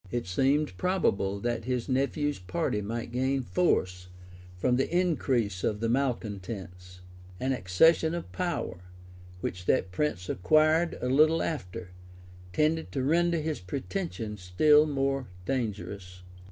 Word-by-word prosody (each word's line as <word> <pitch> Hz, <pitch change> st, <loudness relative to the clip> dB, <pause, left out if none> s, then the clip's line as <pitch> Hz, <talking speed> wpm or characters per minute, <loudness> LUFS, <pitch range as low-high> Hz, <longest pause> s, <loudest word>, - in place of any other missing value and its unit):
] 95 Hz, -, -18 dB
It 120 Hz, -1 st, -2 dB
seemed 135 Hz, +6 st, +1 dB
probable 100 Hz, -, 0 dB
that 120 Hz, -1 st, -2 dB
his 125 Hz, -2 st, -1 dB
nephew's 140 Hz, +2 st, 0 dB
party 90 Hz, +3 st, -2 dB
might 115 Hz, +3 st, -4 dB
gain 130 Hz, +2 st, 0 dB
force 90 Hz, -, 0 dB, 0.5 s
from 125 Hz, +7 st, +2 dB
the 135 Hz, -, 0 dB
increase 135 Hz, -, 0 dB
of 105 Hz, -1 st, 0 dB
the 115 Hz, +1 st, 0 dB
malecontents; 100 Hz, -8 st, -3 dB, 0.4 s
an 130 Hz, +1 st, 0 dB
accession 160 Hz, -, +3 dB
of 170 Hz, -, -6 dB
power, 175 Hz, -, -3 dB, 0.6 s
which 90 Hz, +1 st, -4 dB
that 95 Hz, -, +1 dB
prince 90 Hz, -5 st, -1 dB
acquired 155 Hz, -, +3 dB
a -, -, -1 dB
little 155 Hz, +5 st, +4 dB
after, 90 Hz, -, -5 dB, 0.6 s
tended 155 Hz, -, +1 dB
to 135 Hz, -, -1 dB
render 170 Hz, +4 st, +2 dB
his 155 Hz, 0 st, -2 dB
pretensions 115 Hz, -, -4 dB
still 150 Hz, +12 st, +5 dB
more 135 Hz, -2 st, -1 dB, 0.2 s
dangerous. 100 Hz, -7 st, -4 dB
125 Hz, 130 wpm, -28 LUFS, 95-150 Hz, 0.6 s, still